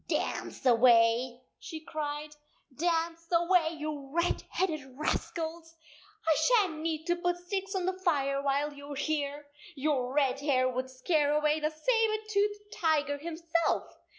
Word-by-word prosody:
" - - -44
Dance - - -2
away," 240 0 +4 0.2
she 320 - -7
cried, 300 -1 -5 0.2
" 270 - -30
dance 330 +1 -1
away, 340 -1 +3
you 300 -2 -5
red 340 +3 +1
headed 320 -6 -1
rascals! 325 +2 -3 0.5
I 320 - +6
shan 410 -10 +3
t - - -7
need 315 -1 -2
to 345 0 +2
put 350 0 -1
sticks 390 +2 -4
on 370 -2 0
the 375 - +1
fire 275 -6 +1
while 285 +1 0
you 285 0 -9
are - - -6
here. 290 0 -2 0.3
Your 270 -3 0
red 275 -2 +2
hair 270 -3 +2
would 255 +1 -2
scare 290 +3 +1
away 300 +1 +2
the 305 0 0
saber 435 +6 +1
toothed 415 0 0
tiger 295 -3 +1
himself! 335 +1 -1
310 Hz, 155 wpm, -30 LUFS, 285-340 Hz, 0.5 s, I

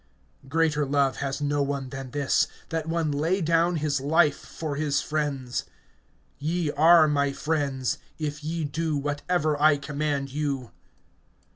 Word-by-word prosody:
(13)Greater 150 -1 +1
love 140 -2 +2
has 140 +1 -3
no 145 0 +1
one 140 -2 -2
than 135 -1 -6
this, 145 +1 +1 0.2
that 165 -1 -3
one 165 -2 0
lay 160 +7 +1
down 170 +1 +2
his 150 -3 0
life 150 +1 +3
for 155 -3 -5
his 145 -1 +1
friends. 140 -4 -2 0.8
(14)Ye 160 0 0
are 160 +1 +7
my 140 -1 +1
friends, 140 -4 -1 0.2
if 150 -1 -4
ye 165 +1 -2
do 155 +1 -1
whatever 145 +1 -1
I 150 -1 +6
command 140 -1 -2
you. 140 -4 -2
145 Hz, 140 wpm, -26 LUFS, 140-155 Hz, 0.8 s, are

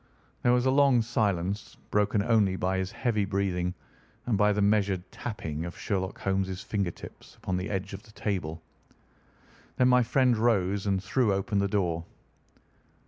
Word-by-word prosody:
There 120 - +3
was 125 0 +3
a 130 - +4
long 135 -4 +4
silence, 105 -4 -1
broken 105 0 +2
only 105 -4 +3
by 95 0 0
his 95 0 -3
heavy 115 -5 0
breathing 95 -2 -1 0.5
and 120 - +1
by 105 +1 +4
the 105 - 0
measured 100 -3 +2
tapping 80 -9 -5
of 85 0 -7
Sherlock 95 -3 -2
Holmes' 95 -1 -1
finger 100 -4 -1
tips - - -12
upon 95 - -3
the 90 +3 -3
edge 95 -1 -3
of 95 - -7
the 110 -1 -18
table. 85 -7 -3 1.1
Then 125 0 +4
my 125 0 +5
friend 125 +1 +3
rose 100 -3 +1
and 95 -1 0
threw 120 0 +1
open 100 +1 0
the 100 - +2
door. 90 -5 0
100 Hz, 165 wpm, -28 LUFS, 95-110 Hz, 1.1 s, my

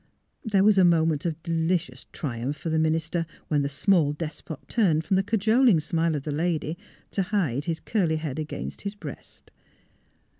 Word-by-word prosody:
There 205 -5 +2
was 205 -1 +5
a - - +6
moment 165 -2 +3
of 165 -1 -4
delicious 165 -5 -1
triumph 130 0 -3
for 165 - -4
the 160 - +2
minister, 160 +1 0 0.2
when 150 -2 +2
the 140 - -1
small 155 0 +2
despot 155 -1 -7
turned 170 -9 +2
from 190 - +1
the 190 - +4
cajoling 220 0 +3
smile 165 +1 0
of 145 - -3
the 150 - -3
lady 160 0 -1 0.4
to 195 - 0
hide 175 - 0
his 165 -2 -2
curly 180 -8 0
head 155 -2 -4
against 155 -1 -5
his 200 0 -4
breast. 210 - -10
165 Hz, 175 wpm, -26 LUFS, 150-190 Hz, 0.4 s, a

